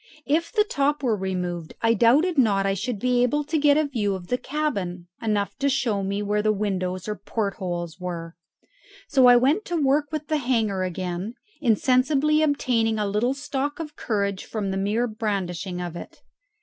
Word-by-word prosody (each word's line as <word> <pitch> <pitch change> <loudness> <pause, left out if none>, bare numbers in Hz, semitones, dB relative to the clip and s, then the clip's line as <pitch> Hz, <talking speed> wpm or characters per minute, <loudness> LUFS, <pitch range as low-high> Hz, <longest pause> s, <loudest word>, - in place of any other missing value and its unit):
If 320 +4 +1
the 430 -3 +3
top 285 -2 0
were 235 -4 +2
removed 180 -4 -4
I 230 0 +5
doubted 275 - +4
not 205 -8 +3
I 195 - +2
should 215 +4 -3
be 250 +3 +1
able 295 +5 +2
to 310 +2 -1
get 290 0 +5
a 310 - +3
view 215 -8 -1
of 175 -2 -9
the 250 - +1
cabin, 200 - -3 0.2
enough 205 -3 -1
to 280 - +2
show 240 -7 0
me 200 +1 -2
where 210 +1 0
the 215 0 +2
windows 185 -3 -2
or 210 - -2
port 205 +1 -3
holes 175 -4 -4
were. 170 -2 -5 0.7
So 265 -3 +5
I 245 - +8
went 280 - +3
to 350 - -2
work 290 0 +2
with 305 -1 -4
the 310 - +1
hanger 225 -8 0
again, 185 +4 -3 0.3
insensibly 270 +5 +3
obtaining 245 -7 +1
a 210 - 0
little 215 +6 0
stock 285 +1 -3
of 300 -2 -6
courage 200 -4 -1
from 205 -3 -3
the 190 - -2
mere 210 +5 +1
brandishing 195 -5 -3
of 175 -1 -5
it. - - -10
220 Hz, 190 wpm, -24 LUFS, 195-275 Hz, 0.7 s, I